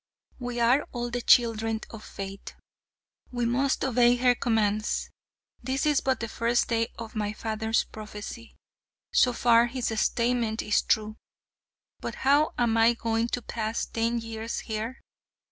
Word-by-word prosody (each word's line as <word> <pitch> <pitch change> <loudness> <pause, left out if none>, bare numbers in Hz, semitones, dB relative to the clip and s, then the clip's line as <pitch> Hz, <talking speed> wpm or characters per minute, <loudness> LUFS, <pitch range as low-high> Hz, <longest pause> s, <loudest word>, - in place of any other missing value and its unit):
We 245 -1 -4
are 245 +5 +3
all 240 -1 -3
the 245 0 -2
children 225 -2 +3
of 225 -1 -9
fate. 195 0 -8 0.8
We 245 -1 -1
must 265 +4 +1
obey 245 -1 +4
her 250 0 +4
commands. 215 -3 0 0.5
This 265 +4 -1
is 295 -2 +3
but 265 -3 0
the 230 - -2
first 235 +2 0
day 230 -1 +1
of 230 -1 -8
my 210 -1 -2
father's 220 +1 -1
prophecy. 215 +2 -9 0.6
So 250 - +5
far 235 -1 +4
his 245 0 -2
statement 235 -2 0
is 210 - +2
true. 215 0 0 0.8
But - - -5
how 290 +3 +4
am 235 -2 +2
I 230 +1 +5
going 230 0 0
to 245 0 -3
pass 220 0 -2
ten 230 +1 -1
years 225 0 -4
here? 225 +3 -5
230 Hz, 145 wpm, -27 LUFS, 220-245 Hz, 0.8 s, So